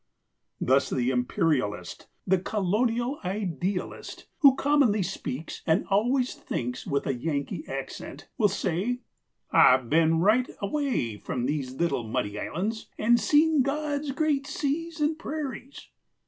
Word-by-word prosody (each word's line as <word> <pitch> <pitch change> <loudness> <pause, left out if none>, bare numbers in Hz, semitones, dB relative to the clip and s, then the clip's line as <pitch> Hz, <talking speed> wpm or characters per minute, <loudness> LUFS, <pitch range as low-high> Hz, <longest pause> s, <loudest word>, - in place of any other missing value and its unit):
Thus 135 +1 +2
the 125 0 0
Imperialist, 125 -2 -1 0.2
the 190 0 +3
Colonial 230 +8 0
idealist 185 -1 -3
(who 280 -5 +7
commonly 275 -9 +3
speaks 160 -5 -5
and 165 +5 +3
always 245 +6 +2
thinks 125 0 -4
with 140 -1 0
a 135 - 0
Yankee 140 - -3
accent) - - -7
will 220 -5 +4
say, 200 +6 -1 0.5
"I've 125 -2 +5
been 160 +1 +4
right 220 +8 +3
away 200 - -1
from 120 +3 -3
these 135 -2 -2
little 170 -4 0
muddy 105 -2 -2
islands, 215 - -3
and 235 +2 +4
seen 305 +2 +4
God's 290 +1 -1
great 280 -1 0
seas 320 +3 -2
and 305 +1 0
prairies." 280 -4 -6
205 Hz, 125 wpm, -27 LUFS, -, 0.5 s, who